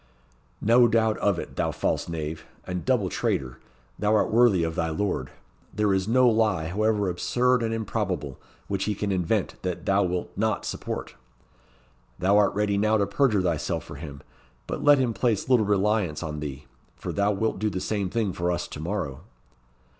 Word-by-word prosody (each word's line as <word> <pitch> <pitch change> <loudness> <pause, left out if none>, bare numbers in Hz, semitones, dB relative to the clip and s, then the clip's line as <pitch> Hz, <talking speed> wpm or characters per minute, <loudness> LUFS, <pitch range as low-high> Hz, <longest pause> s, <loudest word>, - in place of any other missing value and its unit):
"No 120 +3 +5
doubt 110 -1 +2
of 100 -3 +2
it, - - -6
thou - - +1
false - - -1
knave, 80 -1 -5 0.2
and 90 -1 -4
double 125 -7 +2
traitor! 65 -7 -2 0.4
thou 105 +1 +2
art - - +2
worthy 110 -6 +4
of 80 0 -1
thy 80 0 -1
lord. 95 +5 -2 0.4
There 105 -2 +1
is 95 0 0
no 125 +2 +4
lie, 110 -8 +2
however 105 +1 +1
absurd 125 +8 +1
and 115 -1 -1
improbable, 95 - -3 0.3
which 100 -1 -1
he 105 - -1
can 100 +1 -2
invent, 90 -3 -1
that 90 -2 -4
thou 100 +1 +3
wilt 90 -2 -2
not 110 +1 0
support. - - -5 1.0
Thou 95 +3 +2
art 105 -2 +3
ready 100 -1 +1
now 110 +1 +3
to 100 - +2
perjure 105 -1 +2
thyself 85 -4 -1
for 75 - -10
him; 70 -2 -8 0.4
but - - -4
let 145 0 +7
him 125 -3 +1
place 115 -3 0
little 120 -5 +3
reliance 100 -5 +1
on 75 -2 -4
thee, 75 -1 -6 0.3
for 60 - -5
thou 100 +1 +2
wilt 110 0 -1
do 105 +1 +1
the 95 - -3
same 100 -1 -2
thing 105 -2 -1
for 90 +1 -1
us 85 0 -2
to - - -8
morrow." 80 -5 -3
100 Hz, 185 wpm, -26 LUFS, 85-110 Hz, 1.0 s, let